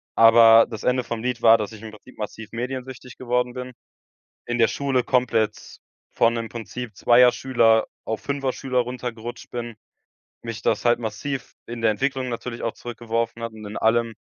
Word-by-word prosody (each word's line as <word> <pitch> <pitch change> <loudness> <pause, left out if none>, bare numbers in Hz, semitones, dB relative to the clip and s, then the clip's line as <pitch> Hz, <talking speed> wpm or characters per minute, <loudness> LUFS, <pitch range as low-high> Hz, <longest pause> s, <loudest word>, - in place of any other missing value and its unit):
Aber 115 0 +8
das 110 -3 -7
Ende 125 0 +1
vom 115 -1 -5
Lied 125 0 -2
war, 115 0 +7
dass 105 -1 -4
ich 110 - -11
im 110 -1 -8
Prinzip 110 +4 -16
massiv 110 +1 -7
mediensüchtig 125 +1 -6
geworden 125 0 -1
bin. 125 0 -7 0.7
In 120 0 -2
der 115 - +5
Schule 135 -3 0
komplett 110 -4 0 0.3
von 115 0 +2
im 115 -1 -3
Prinzip 115 -1 -7
zweier 125 +4 +6
Schüler 115 -4 +3 0.2
auf 110 - -4
fünfer 140 -2 -2
Schüler 130 -1 -2
runtergerutscht 120 -1 -5
bin, 120 -1 -5 0.7
mich 115 -2 -6
das 110 - 0
halt 120 0 +4
massiv 120 +4 -5
in 120 0 -7
der 115 -1 +3
Entwicklung 130 +2 -2
natürlich 120 0 -5
auch 115 - -2
zurückgeworfen 115 -1 -4
hat 115 -1 -4
und 110 -1 -11
in 105 +1 -7
allem. 115 0 +1
120 Hz, 175 wpm, -23 LUFS, 115-125 Hz, 0.7 s, Aber